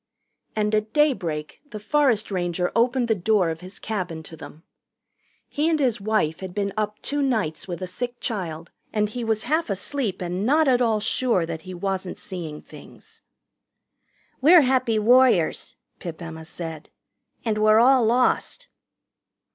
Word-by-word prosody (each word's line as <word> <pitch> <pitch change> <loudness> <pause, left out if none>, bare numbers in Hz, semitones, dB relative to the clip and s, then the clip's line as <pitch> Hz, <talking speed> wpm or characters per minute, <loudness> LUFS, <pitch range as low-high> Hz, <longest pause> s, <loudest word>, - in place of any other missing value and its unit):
And 210 0 0
at 215 0 0
daybreak 175 - 0
the 215 - -7
forest 235 -3 +1
ranger 180 -1 -1
opened 245 +1 +2
the 225 - +3
door 195 -3 +1
of 160 +1 -7
his 185 +2 -9
cabin 180 -7 -4
to 160 - -11
them. 155 0 -12 0.8
He 300 +3 0
and 320 -2 +1
his 245 -7 +1
wife 200 -7 0
had 190 -2 -7
been 200 -1 -1
up 210 -1 -2
two 290 +1 -1
nights 210 - -1
with 180 0 -5
a - - -1
sick 240 +7 -5
child, 170 -7 -4 0.2
and 210 -1 0
he 240 +3 -5
was 220 -1 0
half 315 +3 0
asleep 200 +1 -2
and 180 +2 -3
not 300 +6 +3
at 250 -2 +3
all 225 -3 +2
sure 220 -4 +1
that 165 -1 -6
he 185 - -6
wasn't 190 0 -3
seeing 165 -5 -7
things. - - -14 1.2
"We're 330 +5 +8
Happy 255 -4 +2
Warriors," 235 -6 +3 0.2
Pip 170 -2 -7
Emma 160 -2 -8
said, 160 -2 -8 0.6
"and 215 -2 0
we're 215 0 +5
all 255 +1 +5
lost." 250 - +1
210 Hz, 160 wpm, -24 LUFS, 180-245 Hz, 1.2 s, We're